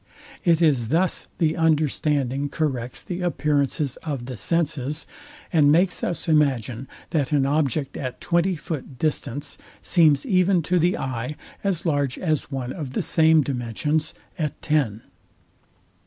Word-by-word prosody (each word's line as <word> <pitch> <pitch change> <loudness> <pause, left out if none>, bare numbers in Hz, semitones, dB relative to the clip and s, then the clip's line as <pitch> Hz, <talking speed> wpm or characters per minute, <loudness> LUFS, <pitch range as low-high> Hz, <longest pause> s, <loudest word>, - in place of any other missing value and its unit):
It 170 -1 +3
is 135 -8 +3
thus 170 +8 +1
the 160 -1 +1
understanding 145 -4 +1
corrects 130 -6 -2
the 180 0 -5
appearances 145 -4 0
of 140 -6 -5
the 130 0 -6
senses, 150 - 0 0.5
and 145 -3 +5
makes 180 +4 +2
us 175 - -2
imagine, 135 -5 +1 0.2
that 145 -4 0
an 140 -2 +3
object 140 -1 0
at 130 -2 -5
twenty 175 +2 +1
foot 150 -5 -6
distance 145 -1 -2 0.2
seems 155 -5 +4
even 185 -5 +3
to 180 +3 +1
the 175 +3 +2
eye 130 +2 -4 0.3
as 185 -4 -1
large 145 -5 0
as 155 -5 -1
one 130 -3 -4
of 145 -7 -6
the - - 0
same 160 -1 +4
dimensions 140 +5 -2 0.2
at 150 -3 -2
ten. 135 -9 0
150 Hz, 140 wpm, -24 LUFS, 135-165 Hz, 0.5 s, and